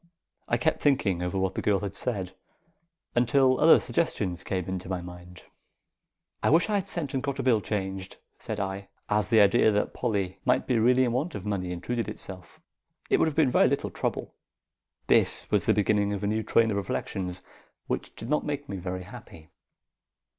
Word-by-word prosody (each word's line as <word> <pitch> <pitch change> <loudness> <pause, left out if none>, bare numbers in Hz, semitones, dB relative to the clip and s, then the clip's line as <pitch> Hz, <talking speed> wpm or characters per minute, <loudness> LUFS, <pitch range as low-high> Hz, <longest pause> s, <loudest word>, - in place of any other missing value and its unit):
I - - +1
kept 160 - 0
thinking 125 - +2
over 90 +2 -2
what 95 0 0
the - - -3
girl 100 -2 +1
had 100 -1 -4
said, 95 -5 -4 0.8
until 130 +2 +3
other 160 - +7
suggestions 95 - -2
came 95 -1 -2
into 95 -1 -5
my 95 -1 -2
mind. 90 0 -11 1.0
"I - - +2
wish 165 +5 +3
I 205 - +3
had 195 - -6
sent 160 -8 -3
and 135 - 0
got 140 -1 -3
a 135 - -2
bill 120 -4 +3
changed," 95 -2 -4 0.2
said 110 -1 -4
I, 95 0 -4 0.2
as 105 -2 +1
the 115 -2 +4
idea 105 +2 +5
that 105 -1 0
Polly 100 -6 -2
might 125 - +2
be 125 -3 +1
really 125 +3 +4
in 120 - +1
want 140 +8 -2
of 100 - -6
money 95 -3 -2
intruded 115 +7 -3
itself. 90 -3 -9 0.5
"It - - +4
would - - +3
have 155 - -2
been 150 -6 +3
very - - +5
little - - -1
trouble." - - -3 0.7
This - - +3
was - - +2
the - - +5
beginning 105 0 +2
of 100 0 -4
a - - 0
new 110 +1 0
train 115 0 +2
of 100 - -1
reflections, 95 -2 -3 0.4
which - - -4
did 115 - -8
not 150 +4 +1
make 145 -1 -4
me 100 - -5
very 90 0 -5
happy. 80 -3 -13
105 Hz, 195 wpm, -27 LUFS, 95-125 Hz, 1.0 s, other